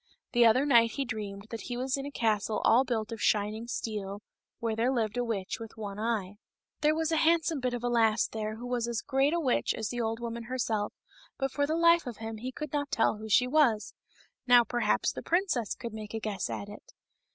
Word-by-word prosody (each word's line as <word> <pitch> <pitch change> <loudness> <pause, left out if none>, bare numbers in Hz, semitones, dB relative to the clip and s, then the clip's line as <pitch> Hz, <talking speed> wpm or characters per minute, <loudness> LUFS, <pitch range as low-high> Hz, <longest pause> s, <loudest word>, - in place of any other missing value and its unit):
The 240 -1 +6
other 255 +5 +4
night 235 -5 +5
he 275 - -2
dreamed 205 -4 -5
that 230 - -5
he 245 - -4
was 260 +1 0
in 275 0 -4
a - - -7
castle 215 -3 0
all 235 +4 +6
built 230 -3 -2
of 225 - -6
shining 215 +2 +1
steel, 210 -4 -4 0.3
where 225 -1 -2
there 235 +3 +1
lived 225 -4 -1
a 245 - 0
witch 215 -3 -3
with 225 -1 -9
one 205 -2 -6
eye. 210 -3 -2 0.4
There 305 0 +3
was 320 0 0
a 320 - +2
handsome 325 -1 +2
bit 250 -1 -1
of 240 - -6
a - - +1
lass 225 -2 +3
there 215 -1 -4
who 235 +2 -8
was 245 -1 -1
as 235 -2 -2
great 270 +1 +2
a 340 - +1
witch 260 -7 +1
as 220 -3 -3
the 240 +2 -2
old 225 0 -2
woman 235 -1 -5
herself, 225 -4 -1 0.5
but 270 -1 -1
for 285 +1 0
the 315 - 0
life 335 -2 +4
of 240 - -6
him 225 0 -6
he 250 +4 -5
could 300 +3 -7
not 290 -1 -1
tell 225 -3 +2
who 220 +1 -8
she 250 +4 +5
was; 250 -6 +2 0.5
now 245 -1 +7
perhaps 240 +1 +1
the - - -7
princess 340 - 0
could 235 -2 -7
make 215 0 -7
a - - -2
guess 210 -3 -3
at 200 - -4
it. 205 +1 -12
235 Hz, 230 wpm, -29 LUFS, 220-260 Hz, 0.5 s, now